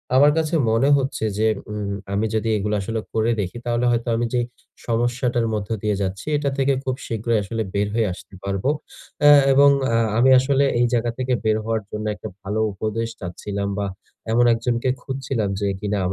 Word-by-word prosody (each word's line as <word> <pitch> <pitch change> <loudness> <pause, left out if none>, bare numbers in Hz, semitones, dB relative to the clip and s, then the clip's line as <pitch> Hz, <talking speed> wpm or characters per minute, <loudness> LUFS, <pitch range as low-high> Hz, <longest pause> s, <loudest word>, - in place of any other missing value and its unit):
আমার 145 +3 +7
কাছে 160 +1 0 0.2
মনে 115 +5 +3
হচ্ছে 135 -4 -2
যে, 110 +1 +2 0.2
উম 105 -1 -3 0.2
আমি 105 +2 +1
যদি 110 +1 0
এগুলো 105 +1 -1
আসলে 110 +3 -3
করে 110 +1 +2
দেখি, 90 +3 -5
তাহলে 120 0 0
হয়তো 120 0 -1
আমি 120 +1 0
যেই 120 -1 +1 0.4
সমস্যাটার 120 +1 0
মধ্য 105 -2 -3
দিয়ে 105 -1 +1
যাচ্ছি, 95 0 -3
এটা 145 -1 0
থেকে 135 0 +2
খুব 130 -1 -1
শীঘ্রই 115 0 0
আসলে 110 +3 -3
বের 100 0 +1
হয়ে 115 -2 +2
আসতে 95 - -14
পারবো। 100 +5 -1 0.6
এহ 145 -1 +9
এবং 140 +1 +7 0.3
আহ 115 0 +3
আমি 125 +3 +5
আসলে 135 +1 +2 0.2
এই 120 - +4
জায়গা 120 0 +1
থেকে 130 0 -1
বের 110 0 +2
হওয়ার 110 0 -1
জন্য 105 0 -4
একটা - - -8
ভালো 100 +2 -3
উপদেশ 110 +3 -2
চাচ্ছিলাম, 100 +3 -4
বা, 100 - -1 0.5
এমন 120 +2 +4
একজনকে 120 +2 -1
খুঁজছিলাম 130 -6 -2
যে, 100 - 0
কিনা 105 0 -1
115 Hz, 185 wpm, -22 LUFS, 105-125 Hz, 0.6 s, এহ